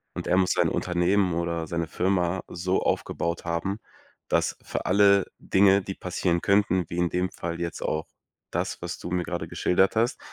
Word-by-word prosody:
und - - -5
er 90 - +3
muss 95 -1 +3
sein - - +2
Unternehmen 90 +1 +1
oder 85 -1 -2
seine 85 0 -2
Firma 90 +1 0
so 90 +2 -1
aufgebaut 85 0 -1
haben, 85 +5 -2 0.5
dass - - +1
für - - -4
alle 100 0 +5
Dinge, 100 0 +4
die 95 0 -6
passieren 90 -1 -1
könnten, 100 -3 +2
wie 85 - -5
in 90 -1 +2
dem 90 +2 0
Fall 85 0 -5
jetzt 85 -1 -4
auch 80 0 -1 0.5
das, - - -2
was - - -5
du - - -6
mir 90 0 0
gerade 85 0 -4
geschildert 95 +3 +2
hast 115 +2 +1
90 Hz, 180 wpm, -26 LUFS, 85-95 Hz, 0.5 s, alle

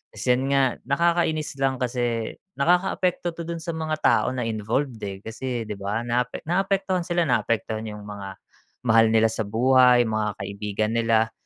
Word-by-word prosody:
Tas, - - -6
yan 125 +1 +2
nga, 140 0 +3 0.2
nakakainis 160 -1 +1
lang 135 -1 +1
kasi 120 -3 -1 0.2
nakakaapekto 175 +2 +1
'to 170 - -5
do'n 170 0 -5
sa 165 0 -5
mga 155 -1 -2
tao - - +3
na 125 -3 -2
involved 115 +3 -2
eh, 100 -1 -5
kasi, 115 +2 -5
'di 105 - -4
ba? 100 +3 -2
Naapek 125 +4 -2
naapektuhan 190 0 0
sila, 175 -1 0
naapektuhan 110 -3 0
yung 105 0 -9
mga 100 -2 -8 0.4
mahal 115 -1 +5
nila 110 0 +3
sa 110 - -3
buhay, 125 +2 +5
yung 115 - -3
mga 110 -1 0
kaibigan 105 +2 -2
nila, 115 -1 +2
125 Hz, 170 wpm, -24 LUFS, 110-155 Hz, 0.4 s, mahal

